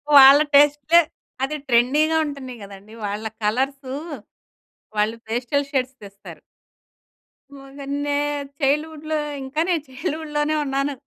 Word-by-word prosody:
వాళ్ళ 275 Hz, +1 st, +10 dB, 0.2 s
టేస్ట్‌‌లే 295 Hz, +3 st, +5 dB, 0.4 s
అది 300 Hz, +3 st, -1 dB
ట్రెండీ‌గా 285 Hz, +7 st, +3 dB
ఉంటన్నయి 265 Hz, -4 st, -7 dB
కదండీ! 200 Hz, +2 st, -12 dB
వాళ్ళ 205 Hz, +2 st, -4 dB, 0.2 s
కలర్సూ 265 Hz, +4 st, -1 dB, 1.0 s
వాళ్ళు 210 Hz, +2 st, +1 dB
పేస్టల్ 245 Hz, +5 st, -1 dB
షేడ్స్ 265 Hz, -1 st, -1 dB
తెస్తారు. 200 Hz, 0 st, -12 dB, 1.2 s
మొగన్నే 280 Hz, +1 st, -4 dB, 0.4 s
చైల్డ్‌హుడ్‌లో 310 Hz, +2 st, 0 dB, 0.3 s
ఇంకా 270 Hz, +4 st, -2 dB
నేను 335 Hz, -5 st, +1 dB
చైల్డ్‌హుడ్‌ 310 Hz, +3 st, -5 dB
లోనే 295 Hz, +1 st, +1 dB
ఉన్నాను 275 Hz, +1 st, -1 dB
275 Hz, 105 wpm, -22 LUFS, 250-295 Hz, 1.2 s, వాళ్ళ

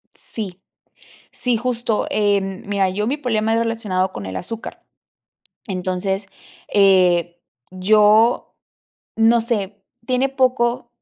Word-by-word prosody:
Sí. 195 Hz, -5 st, -7 dB, 0.7 s
Sí, 245 Hz, -2 st, 0 dB
justo. 235 Hz, -2 st, -1 dB
Em, 200 Hz, -2 st, 0 dB
mira, 200 Hz, -1 st, +1 dB
yo 210 Hz, +3 st, -2 dB
mi 275 Hz, -, 0 dB
problema 225 Hz, -6 st, 0 dB
era 230 Hz, +1 st, +2 dB
relacionado 200 Hz, -5 st, -1 dB
con 100 Hz, -, -7 dB
el 95 Hz, -, -5 dB
azúcar. 225 Hz, +5 st, -7 dB, 0.9 s
Entonces, 190 Hz, +1 st, -2 dB, 0.5 s
eh, 180 Hz, -3 st, +4 dB, 0.3 s
yo, 210 Hz, +5 st, +3 dB, 0.6 s
no 225 Hz, +1 st, +4 dB
sé, 205 Hz, -3 st, -3 dB, 0.2 s
tiene 255 Hz, +2 st, +1 dB
poco 250 Hz, -3 st, +1 dB
210 Hz, 110 wpm, -20 LUFS, 190-230 Hz, 0.9 s, eh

